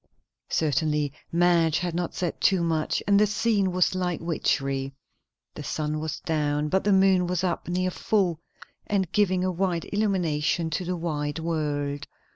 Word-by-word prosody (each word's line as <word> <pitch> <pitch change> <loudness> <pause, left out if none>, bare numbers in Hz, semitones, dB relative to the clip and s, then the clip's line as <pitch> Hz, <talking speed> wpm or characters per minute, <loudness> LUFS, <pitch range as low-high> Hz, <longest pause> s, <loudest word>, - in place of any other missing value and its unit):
Certinaly 150 -1 0 0.2
Madge 170 -2 +3
had 175 -1 -2
not 175 0 -3
said 175 -3 -3
too 190 -3 +3
much, 160 -2 0
and 200 0 +5
the 210 - +4
scene 205 -2 +1
was 180 0 +2
like 180 -2 -1
witchery. 135 -4 -1 0.6
The - - -8
sun 155 0 -2
was 155 -1 -4
down, 150 -2 0
but 190 +4 +1
the 205 - +2
moon 190 -2 +4
was 180 0 -1
up, 180 -2 -1
near 185 +1 0
full, 180 -5 0 0.5
and 190 -4 0
giving 185 -3 +2
a 185 - +1
white 175 -1 -1
illumination 170 -6 0
to 180 - -1
the 180 +1 -2
white 150 -2 -2
world. 145 -3 -2
170 Hz, 160 wpm, -26 LUFS, 155-185 Hz, 0.6 s, and